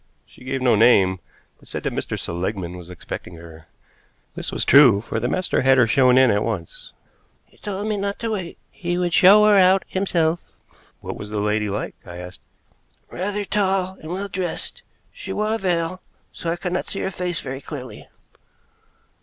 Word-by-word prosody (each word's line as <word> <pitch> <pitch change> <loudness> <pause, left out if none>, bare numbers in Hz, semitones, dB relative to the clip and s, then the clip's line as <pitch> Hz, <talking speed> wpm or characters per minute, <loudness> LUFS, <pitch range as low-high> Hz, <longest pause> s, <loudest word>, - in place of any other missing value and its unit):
She - - -18
gave 130 0 -3
no 125 - +4
name, 100 -5 +4 0.4
but - - -20
said - - -6
that - - -2
Mr. - - -3
Seligmann 90 +1 -4
was 90 -1 -10
expecting 90 0 -8
her. 80 -1 -13 0.7
This - - -5
was - - -2
true, 130 -8 +7
for 115 +1 -4
the 120 - -1
master 185 +8 0
had 130 - -1
had - - +3
her 125 - +6
shown 125 +2 +4
in 130 -3 +6
at 100 0 +1
once. 105 -7 -5 0.5
"He - - -27
told 205 0 -4
me 215 -1 -1
not 200 0 -2
to 230 -1 -3
wait. 185 -5 -4
He 175 -1 -3
would 175 -1 -1
show 205 +4 +7
her 210 -1 +6
out 190 +1 +4
himself." 175 -4 -1 0.5
"What - - -6
was 105 - -8
the 105 - -4
lady 105 0 0
like?" 100 +2 -3
I 85 -1 -10
asked. 90 +1 -10 0.7
"Rather 205 +3 -3
tall 190 -2 0
and 155 - -8
well 195 +3 -3
dressed. 185 -3 -4 0.3
She - - -8
wore 215 +1 -1
a 225 - -1
veil, 180 -1 -1 0.3
so 170 - -5
I 165 - 0
could 180 0 -4
not 180 - -2
see 195 - -4
her 190 - -2
face 180 -4 -3
very 135 +1 -6
clearly." 130 -8 -9
160 Hz, 195 wpm, -22 LUFS, -, 0.7 s, true